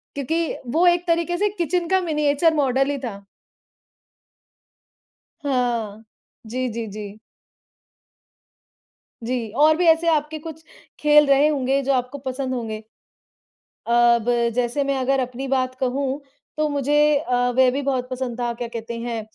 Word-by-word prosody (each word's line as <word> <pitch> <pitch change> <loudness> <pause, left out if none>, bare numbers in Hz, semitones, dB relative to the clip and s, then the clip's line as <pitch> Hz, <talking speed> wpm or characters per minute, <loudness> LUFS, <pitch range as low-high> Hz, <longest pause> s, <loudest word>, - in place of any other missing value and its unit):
क्योंकि 320 +4 -1 0.2
वो 340 +4 +3
एक 350 0 +3
तरीके 340 +1 +1
से 415 - +2
किचन 345 +1 0
का 380 0 +3
मिनिएचर 305 -1 +1
मॉडल 270 -1 +1
ही 280 - -2
था। 200 -4 -6 2.2
हाँ। 235 -6 -2 0.4
जी, 255 +3 -2
जी, 230 0 -4
जी। 210 0 -8 2.1
जी। 235 -2 -2
और 305 +2 +5
भी 355 - +1
ऐसे 325 +1 +4
आपके 310 -1 0
कुछ 320 0 -9 0.4
खेल 300 0 +6
रहे 280 +1 +4
होंगे 275 -2 +1
जो 275 +1 +1
आपको 255 +2 -2
पसंद 260 0 -3
होंगे? 220 -3 -5 1.0
अब 235 -1 +4 0.3
जैसे 245 +3 0
मैं 275 -1 0
अगर 265 +1 +1
अपनी 255 +2 -4
बात 255 -1 0
कहूँ 265 +2 -1 0.4
तो 305 0 +1
मुझे 285 0 -1 0.2
अ, 250 -4 -3 0.2
वह 260 -1 +5
भी 275 +3 -2
बहुत 260 -2 -1
पसंद 250 -2 -4
था, 240 -1 -1
क्या 240 0 -5
कहते 230 0 -6
हैं 235 -1 -3
270 Hz, 145 wpm, -22 LUFS, 245-300 Hz, 2.2 s, खेल